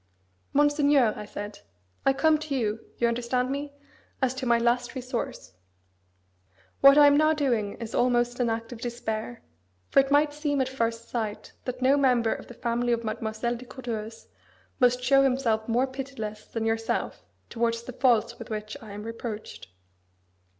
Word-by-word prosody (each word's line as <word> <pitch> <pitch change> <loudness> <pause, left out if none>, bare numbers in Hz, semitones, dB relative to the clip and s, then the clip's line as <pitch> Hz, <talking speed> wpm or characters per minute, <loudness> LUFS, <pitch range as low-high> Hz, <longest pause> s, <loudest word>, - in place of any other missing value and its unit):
"Monseigneur!" 290 -5 +4
I 210 - -7
said, 205 0 -7 0.5
"I 270 - +6
come 310 +2 +3
to 305 -2 -3
you 220 -3 -1 0.2
(you 235 - +2
understand 245 +2 0
me?) 285 +1 -3 0.5
as 260 -2 +1
to 260 -1 -4
my 235 0 +5
last 240 +2 0
resource. 250 - -5 1.3
What 275 +1 +8
I 295 - +9
am 285 0 +6
now 310 +1 +4
doing 240 -9 0
is 230 -1 -7
almost 245 0 +2
an 245 -2 +2
act 225 +1 -3
of 235 -2 -8
despair; 220 - -4 0.5
for - - +6
it 270 0 +3
might 290 +1 +3
seem 295 -1 -1
at 260 - +1
first 230 -3 -2
sight 220 -3 -4
that 255 0 -4
no 270 +2 +5
member 250 -5 +3
of - - -9
the 245 - -11
family 240 +1 0
of 235 0 -1
Mademoiselle 220 +2 -2
de 245 +2 -9
Courteheuse 230 -3 -6 0.5
must 250 -1 +3
show 275 +2 +5
himself 250 -5 +1
more 240 +3 +2
pitiless 260 -6 -6
than 225 -1 -3
yourself 225 0 -1 0.3
towards 230 0 0
the 255 - -8
faults 245 -4 +2
with - - -9
which 215 0 -5
I 215 -3 -10
am 205 +1 -7
reproached. 225 - -7
240 Hz, 170 wpm, -27 LUFS, 225-270 Hz, 1.3 s, I